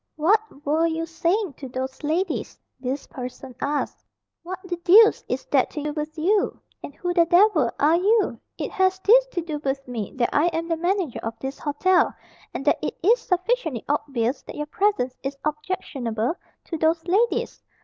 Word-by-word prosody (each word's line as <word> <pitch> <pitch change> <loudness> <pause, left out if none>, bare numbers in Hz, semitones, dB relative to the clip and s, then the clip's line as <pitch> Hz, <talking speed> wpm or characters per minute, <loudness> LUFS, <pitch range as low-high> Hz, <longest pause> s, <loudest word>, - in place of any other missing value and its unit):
"What 350 -1 +1
were 315 +3 +2
you 325 0 -2
saying 340 +2 0
to 265 - -8
those 260 +1 -5
ladies?" 325 +4 -1 0.2
this 260 +2 -3
person 255 0 -8
asked. 290 +1 -2 0.4
"What 365 +2 -6
the 360 -2 -4
deuce 400 +6 +6
is - - -2
that - - +3
to 300 - -5
do 300 0 -2
with 310 +1 -5
you? 395 +6 +1 0.2
And 285 - -8
who 355 -1 -2
the 340 -2 +4
devil 350 - +5
are 310 +4 +4
you?" 420 +4 +2 0.2
"It - - -4
has 375 0 +2
this - - +6
to 370 -8 -3
do 310 -3 -4
with 275 -1 -3
me, 230 -5 -4
that 245 -2 +1
I 300 +4 +4
am 330 -1 -2
the 330 - +2
manager 350 - -1
of 225 0 -5
this 265 +4 -6
hotel, 350 +6 +2 0.4
and - - -5
that - - +3
it - - -3
is 460 +7 +5
sufficiently 360 - -1
obvious 275 -4 -1
that - - -10
your 295 - -3
presence 305 -6 0
is 275 +1 -4
objectionable 275 -7 -2 0.3
to 330 - -5
those 325 +1 +1
ladies. 410 +7 +1
320 Hz, 180 wpm, -24 LUFS, 275-370 Hz, 0.4 s, deuce